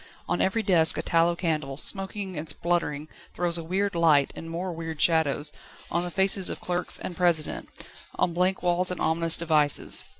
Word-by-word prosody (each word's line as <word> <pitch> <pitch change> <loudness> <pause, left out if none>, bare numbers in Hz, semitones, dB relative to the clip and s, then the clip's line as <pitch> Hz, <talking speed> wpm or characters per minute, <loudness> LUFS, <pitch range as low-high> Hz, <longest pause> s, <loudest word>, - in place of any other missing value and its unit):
On 175 - -1
every 220 +4 0
desk 170 -5 +4
a - - -2
tallow 170 +1 +2
candle, 155 -6 -3
smoking 195 +2 -4
and 155 0 -6
spluttering, 155 -2 -1 0.3
throws 175 -1 +1
a - - -6
weird 195 +4 -1
light, 160 -5 +3
and 165 - -8
more 175 +2 -4
weird 165 -2 -6
shadows, 150 -3 +2 0.4
on 170 - +1
the 180 - -4
faces 190 0 +2
of - - -5
clerks 180 0 0
and 175 - -6
President, 170 -4 0 0.5
on 170 - 0
blank 180 +2 0
walls 180 +1 +2
and 180 - -3
ominous 165 +1 +1
devices. 155 -3 +3
170 Hz, 175 wpm, -26 LUFS, 160-180 Hz, 0.5 s, desk